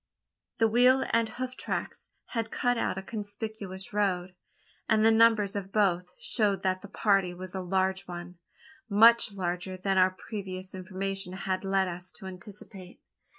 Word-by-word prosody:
The 225 - +4
wheel 250 +4 +5
and 230 -1 +2
hoof 255 +2 -5
tracks - - -4 0.2
had 230 -2 -2
cut 245 0 +1
out 230 - -1
a 190 - -4
conspicuous 205 -2 -6
road; 190 -3 0 0.6
and 220 0 +4
the 225 - +7
numbers 220 -2 +4
of 195 -1 -4
both 180 -4 +1
showed 200 -4 0
that 185 0 0
the 205 - -9
party 195 -3 +1
was 185 0 -7
a 190 - -3
large 190 +1 0
one 175 0 -8 0.5
much 225 +2 +6
larger 185 -1 -3
than 190 +1 +1
our 185 0 +6
previous 185 -1 -7
information 190 0 -4
had 190 0 -2
led 195 -1 +2
us 180 +1 -5
to - - -10
anticipate. 190 0 -9
195 Hz, 155 wpm, -29 LUFS, 185-215 Hz, 0.6 s, the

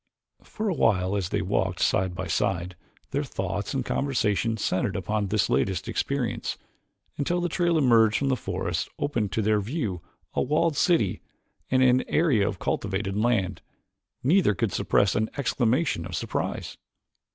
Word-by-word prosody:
For 220 0 -5
a 195 - +1
while, 95 - +2
as 95 -3 -1
they 105 - -1
walked 95 -1 0
side 95 -1 +1
by - - -4
side, 90 0 -1 0.4
their 145 +2 0
thoughts 100 -2 -3
and 130 -2 -1
conversation 115 -5 0
centered 100 -1 -1
upon 100 +2 -1
this - - +1
latest 90 +9 0
experience, - - -2 0.6
until 175 +5 0
the 175 - 0
trail 170 0 +1
emerging 115 -6 +4
from 140 - 0
the 130 - +3
forest - - -3
opened 115 -8 -1
to 110 - 0
their 105 0 +3
view 105 - -3 0.3
a - - +1
walled 155 +3 +1
city 160 - +2 0.5
and 130 0 +3
an 130 0 +5
area 130 -12 +3
of 100 -3 -3
cultivated 100 +2 -2
land. 110 -4 0 0.6
Neither 145 - +4
could - - 0
suppress 100 -2 +2
an 110 +1 0
exclamation 125 - +1
of 90 - -5
surprise. - - -3
110 Hz, 155 wpm, -26 LUFS, 95-140 Hz, 0.6 s, an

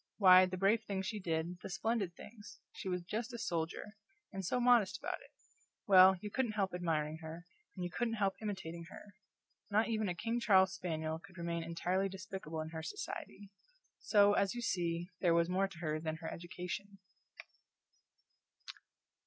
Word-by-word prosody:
Why, 185 -2 +8
the 185 0 -4
brave 205 +4 +3
things 195 -2 -3
she 215 +1 -3
did, 170 -1 -2
the - - -7
splendid 200 -2 -1
things! 210 +2 -12
she 190 - -6
was 180 -1 -2
just 220 +7 -4
a - - -4
soldier; 170 +2 -3 0.4
and 195 0 -4
so 220 +8 0
modest 240 -5 +4
about - - -4
it - - -16 0.6
well, 190 -1 +8
you 210 - -6
couldn't 250 -3 0
help 195 -3 0
admiring 160 -3 -1
her, 165 +1 -8 0.3
and 185 - -4
you 175 - -4
couldn't 230 +4 -1
help 200 -3 +1
imitating 190 -5 -5
her; 205 +1 -12 0.6
not 215 +3 +2
even 215 -3 0
a 175 - -2
King 230 +7 -1
Charles 190 -4 +5
spaniel 160 -4 -3
could 185 +1 -16
remain 170 0 -2
entirely 180 +4 -1
despicable 185 -4 -6
in 155 - -5
her 160 0 -5
society. 205 - -7 0.5
So, 205 -1 +5
as 200 +1 +1
you 240 - -4
see, 175 -2 -1
there 170 -2 +3
was 170 0 +3
more 190 +2 +2
to 195 -4 -13
her 155 -2 -2
than 155 0 -3
her 160 0 -6
education. 180 +3 -6
185 Hz, 175 wpm, -35 LUFS, 170-205 Hz, 0.6 s, Why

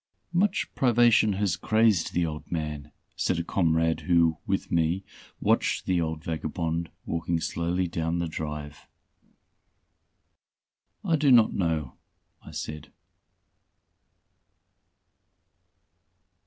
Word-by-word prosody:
"Much 195 +4 +1
privation 120 -4 +4
has 95 -2 0
crazed 110 -1 +2
the 85 -1 +1
old 75 -1 -6
man," 75 -3 -4 0.2
said - - 0
a 85 - -1
comrade 80 -2 +1
who, 85 -3 +2
with 95 -2 -1
me, 85 +3 +1 0.4
watched - - +1
the 90 -2 +1
old 80 -1 -3
vagabond 80 +1 -3 0.2
walking 85 0 -1
slowly 85 +2 -1
down 85 0 -2
the 85 -1 -1
drive. 75 -2 -6 2.2
"I 165 -4 +2
do 145 -1 +2
not 115 -3 +6
know," 80 -7 -1 0.4
I - - -13
said. 75 -1 -7
85 Hz, 100 wpm, -27 LUFS, 80-95 Hz, 2.2 s, not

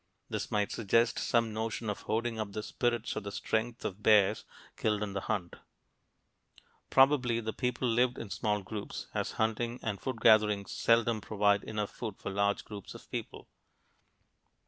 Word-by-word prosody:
This - - -3
might 105 -1 0
suggest 115 +2 +2
some 115 -2 +1
notion 110 +1 -3
of 105 - -3
hoarding 115 0 -1
up 105 -2 -3
the 105 - -3
spirits 120 0 -1
or - - 0
the 100 - -6
strength 115 +3 -2
of 100 +2 -4
bears 105 -3 +4 0.3
killed 105 -1 0
in 100 -2 -4
the 100 - -2
hunt. 95 -6 -3 1.3
Probably 135 -4 +4
the 110 -1 -3
people 125 0 -1
lived 120 +1 +2
in 105 - -7
small 105 -2 -1
groups, 105 +1 -6
as - - -2
hunting 115 +2 -1
and 105 -3 -3
food 130 -4 -3
gathering 105 -2 +5
seldom 115 0 +2
provide 100 -1 +2
enough 105 -2 -3
food 110 -5 -6
for - - -5
large 100 +1 +1
groups 105 -2 -9
of - - -13
people. - - -6
110 Hz, 165 wpm, -31 LUFS, 105-115 Hz, 1.3 s, gathering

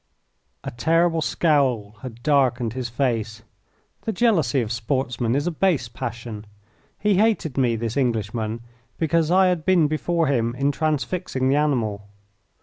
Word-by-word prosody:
A 135 - -5
terrible 165 +6 +2
scowl 130 -11 +1
had 120 -2 -9
darkened 130 -6 +2
his 125 -2 -4
face. 115 -3 -2 0.6
The 225 - -2
jealousy 180 - +2
of 110 -1 -4
sportsmen 120 0 -1
is 145 +2 0
a 175 - 0
base 160 -7 +1
passion. 115 -3 -6 0.5
He 205 -2 +1
hated 205 - +1
me, 125 -4 +2
this 115 0 -3
Englishman, 115 -3 -1 0.4
because 160 0 +1
I 190 +2 +5
had 175 -3 -1
been 175 -4 +4
before 165 +2 0
him 120 -4 0
in 140 +2 +1
transfixing 145 -2 -1
the 135 - +3
animal. 115 -9 0
130 Hz, 145 wpm, -23 LUFS, 115-160 Hz, 0.6 s, I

